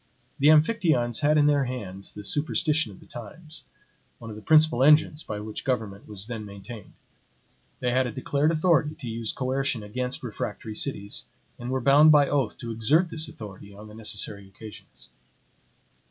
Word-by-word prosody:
The 140 - +4
Amphictyons 155 - +3
had 150 0 +3
in 145 - +5
their 145 -2 +3
hands 100 -7 -6
the 105 - -8
superstition 150 - +1
of 95 - -14
the - - -17
times, 155 +8 -10 0.5
one 115 -1 -9
of - - -8
the 105 - -10
principal 155 -2 +4
engines 150 +1 +5
by 105 -7 -5
which 105 0 -7
government 110 -6 -3
was 105 -2 -8
then 115 -2 -6
maintained; 100 +1 -10 0.9
they 125 - 0
had 130 +1 +2
a - - -4
declared 140 +6 0
authority 155 -2 +2
to 130 - -8
use 115 -1 -3
coercion 130 -2 -2
against 125 +6 -4
refractory 110 -1 -5
cities, 105 -4 -2 0.3
and 120 0 -6
were 130 0 -1
bound 145 +4 +6
by 145 -2 +6
oath 135 -7 0
to 120 -2 -6
exert 150 +11 +2
this 160 0 -2
authority 100 -1 -11
on 105 +2 -11
the - - -13
necessary 105 -2 -3
occasions. 105 +2 -12
125 Hz, 170 wpm, -26 LUFS, 105-150 Hz, 0.9 s, bound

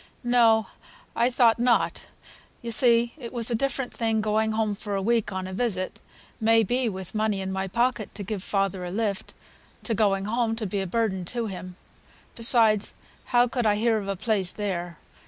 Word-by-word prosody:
"No, 230 -3 +4 0.5
I 240 - +3
thought 240 -2 +3
not. 240 0 +1 0.6
You 235 - -4
see 235 0 +3
it 235 -3 -7
was 240 -1 -1
a - - +1
different 270 +1 -1
thing 225 -1 0
going 215 +1 +1
home 215 -1 0
for 205 0 -5
a - - 0
week 230 0 +1
on 190 -1 -3
a 185 - -6
visit, 190 -4 -2 0.4
may 225 0 +4
be 245 +3 0
with 190 -3 -7
money 215 -2 0
in 190 0 -3
my 190 0 -2
pocket 235 +2 -1
to 205 - -5
give 200 0 -4
father 195 -2 -1
a 180 - -4
lift, 200 0 -3 0.5
to 230 - -1
going 195 -2 +1
home 225 +1 0
to 225 -1 -4
be 200 0 -2
a 190 - -3
burden 190 -2 -1
to 235 +5 -2
him. 185 -3 -7 0.6
Besides, 225 -3 +3 0.3
how 245 0 +3
could 245 -2 -1
I 205 - +3
hear 225 +1 +2
o' 200 - -6
a 195 - -1
place 195 -2 -1
there? 175 -5 -4
220 Hz, 190 wpm, -26 LUFS, 195-235 Hz, 0.6 s, No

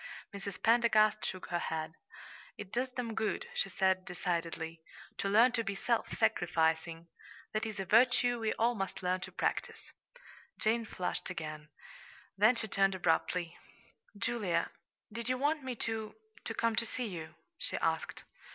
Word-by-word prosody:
Mrs. 200 -1 -6
Pendergast 220 -2 +4
shook 185 - -4
her 175 - 0
head. 160 -1 -3 0.6
"It 200 -2 -8
does 255 +2 0
them 250 -3 -4
good," 220 0 -1
she 195 - 0
said 190 -1 +2
decidedly, 165 -2 -3 0.4
"to 195 - 0
learn 230 +5 +6
to 235 -2 0
be 200 -2 -3
self 230 +3 0
sacrificing. 165 -4 +1 0.5
That 215 +1 0
is 215 -2 -6
a 195 - -2
virtue 245 +3 +4
we 220 -1 0
all 235 +2 +2
must 195 -2 -4
learn 180 +1 +1
to - - -7
practice." - - -2 0.7
Jane 225 +1 +1
flushed 185 -3 -3
again; 155 -3 -6 0.7
then 215 +5 +5
she 225 -1 -3
turned 195 -1 +2
abruptly. 175 0 +1 0.6
"Julia, 200 -7 0 0.4
did 235 +1 -3
you 255 - +2
want 295 +3 +1
me 260 -1 -3
to 220 -1 -3 0.3
to 225 - -2
come 230 -1 +1
to 235 - +2
see 250 - -3
you?" 165 -6 -6 0.2
she - - -2
asked. - - -1
205 Hz, 155 wpm, -33 LUFS, 180-230 Hz, 0.7 s, learn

